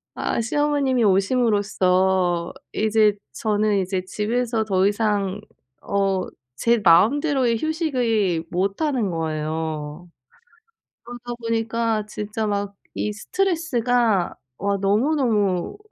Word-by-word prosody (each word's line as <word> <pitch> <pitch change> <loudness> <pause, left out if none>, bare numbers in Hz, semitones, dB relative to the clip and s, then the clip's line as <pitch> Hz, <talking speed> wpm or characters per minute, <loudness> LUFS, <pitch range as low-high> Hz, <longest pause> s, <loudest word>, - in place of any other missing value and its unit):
아 - - -1
시어머님이 275 -1 +1
오심으로써 190 -4 +2 0.2
이제 215 -1 +3 0.2
저는 210 -1 +1
이제 185 0 -2
집에서 225 +3 -1
더 190 -1 +2
이상 205 -2 0 0.4
어 195 -2 0 0.4
제 235 0 +4
마음대로의 245 - +4
휴식의 240 - 0
못하는 200 - 0
거예요. 155 0 -4 0.9
그러다 245 0 -7
보니까 230 -1 -1
진짜 215 +1 -4
막 200 -1 -2 0.2
이 210 - -2
스트레스가 245 - 0 0.2
와 200 +1 0
너무너무 210 - +1
210 Hz, 220 characters per minute, -22 LUFS, 190-240 Hz, 0.9 s, 제